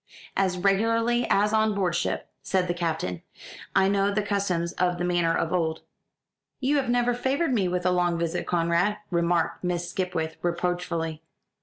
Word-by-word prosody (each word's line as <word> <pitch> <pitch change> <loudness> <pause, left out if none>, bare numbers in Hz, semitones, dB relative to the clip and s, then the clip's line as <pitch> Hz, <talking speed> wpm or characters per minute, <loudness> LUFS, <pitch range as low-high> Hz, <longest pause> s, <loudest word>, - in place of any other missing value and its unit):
"As 190 -2 +1
regularly 230 +5 +2
as 210 +2 +3
on 220 -1 +2
board 185 -4 0
ship," - - -1
said 185 -2 0
the 175 - 0
Captain. 160 - -2 0.5
"I 195 0 +5
know 200 0 +2
the 210 +1 0
customs 190 -4 -1
of 180 -1 0
the 175 - -2
manor 175 -2 +2
of 165 - -1
old." 160 -3 0 0.8
"You 280 +2 +2
have 265 -3 0
never 245 0 +2
favoured 265 +4 0
me 200 -6 +2
with 180 0 -2
a 180 - +4
long 175 -1 +1
visit, 170 +1 -2
Conrad," 175 +4 +1
remarked 170 -1 +1
Miss 175 -1 -1
Skipwith 180 -4 -2
reproachfully. 170 -2 -2
180 Hz, 165 wpm, -26 LUFS, 170-205 Hz, 0.8 s, I